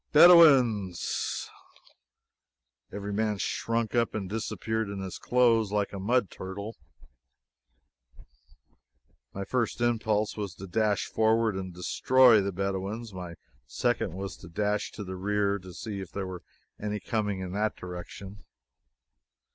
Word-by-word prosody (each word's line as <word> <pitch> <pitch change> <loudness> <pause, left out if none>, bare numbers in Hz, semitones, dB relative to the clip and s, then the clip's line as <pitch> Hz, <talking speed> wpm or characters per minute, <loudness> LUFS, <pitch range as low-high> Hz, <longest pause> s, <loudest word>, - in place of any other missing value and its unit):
"Bedouins!" 135 - +5 1.4
Every 100 0 -5
man 105 0 0
shrunk 115 +3 -1
up 120 -2 +1
and 100 -3 -3
disappeared 110 +1 -3
in 100 -1 -5
his 95 -1 -6
clothes 115 -4 +3
like 105 -1 -1
a 100 - -5
mud 115 +1 +1
turtle. 100 +4 -7 2.6
My 100 0 -5
first 120 0 -1
impulse 110 -3 +1
was 100 -5 -5
to 95 - -9
dash 105 +2 +1
forward 110 -1 +2
and 95 -1 -4
destroy 115 +6 +4
the 100 0 -2
Bedouins. 100 +4 -3
My 90 -2 -7 0.3
second 80 - -1
was 95 0 -5
to 90 - -12
dash 105 +4 -1
to 105 - -6
the 95 -1 -6
rear 100 +1 0
to 90 0 -11
see 100 +3 -6
if 95 - -9
there 100 -1 -4
were 95 -1 -7 0.4
any 105 0 -3
coming 105 -4 -2
in 90 -1 -5
that 105 +3 -1
direction. 95 +2 -9
105 Hz, 130 wpm, -28 LUFS, 95-110 Hz, 2.6 s, Bedouins